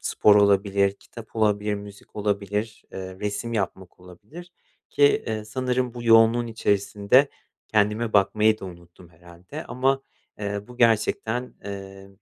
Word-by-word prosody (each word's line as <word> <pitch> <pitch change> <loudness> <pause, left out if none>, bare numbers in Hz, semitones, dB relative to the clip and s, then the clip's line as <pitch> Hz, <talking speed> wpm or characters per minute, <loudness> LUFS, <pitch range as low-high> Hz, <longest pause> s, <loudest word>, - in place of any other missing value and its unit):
spor 105 -1 +4
olabilir, 100 -1 +3
kitap 115 +2 -13
olabilir, 105 -1 +1
müzik 100 +1 -11
olabilir, 105 +1 -2
eee, 95 -1 -7
resim 105 +3 -3
yapmak 95 -4 -4
olabilir 145 - -13 0.4
ki, 145 - +3 0.2
eee, 110 -1 -3
sanırım 125 +2 -2
bu 120 - -7
yoğunluğun 115 +1 +5
içerisinde 105 +3 +2 0.4
kendime 110 +2 +1
bakmayı 105 +2 +3
da - - -7
unuttum 85 -1 -13
herhâlde. 85 - -11
Ama, 135 +2 0 0.4
eee, 100 +1 -4
bu 125 - -12
gerçekten, 115 +1 +1
eee, 95 -1 -8
105 Hz, 130 wpm, -24 LUFS, 100-115 Hz, 0.4 s, yoğunluğun